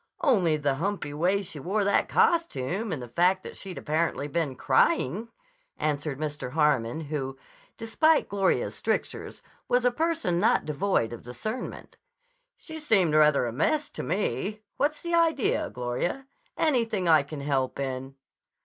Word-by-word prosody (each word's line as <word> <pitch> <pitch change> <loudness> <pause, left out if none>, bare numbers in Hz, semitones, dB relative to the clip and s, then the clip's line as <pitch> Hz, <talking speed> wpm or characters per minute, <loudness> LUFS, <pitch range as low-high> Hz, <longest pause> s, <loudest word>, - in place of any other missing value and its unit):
"Only 185 - +3
the 145 -2 0
humpy 190 -3 -2
way 185 +6 +1
she 175 -5 -8
wore 200 +8 0
that 200 0 +2
costume 220 - +1
and 140 -6 -3
the - - -7
fact 180 +9 +2
that - - -8
she'd 190 -2 -8
apparently 155 -1 -1
been 150 -3 -2
crying," 140 - +2 0.5
answered 145 -2 -2
Mr. 145 -4 -4
Harmon, 150 -3 +1
who, 140 -3 -4 0.4
despite 310 +8 +2
Gloria's 195 -1 +1
strictures, - - -3 0.2
was 245 0 +2
a 250 - +4
person 315 - 0
not 210 - +3
devoid 150 - 0
of 120 - -8
discernment. 215 - -6 0.6
"She 320 -1 -9
seemed 195 - +2
rather 150 -3 +5
a 115 - -3
mess 290 - 0
to - - -6
me. 210 +3 -2
What's 290 +3 0
the 340 0 -3
idea, 330 -6 +2
Gloria? 125 - -3 0.3
Anything 230 - +1
I 160 -2 +6
can 140 +1 -7
help 135 -2 -1
in?" 135 0 -4
170 Hz, 150 wpm, -27 LUFS, 140-220 Hz, 0.6 s, I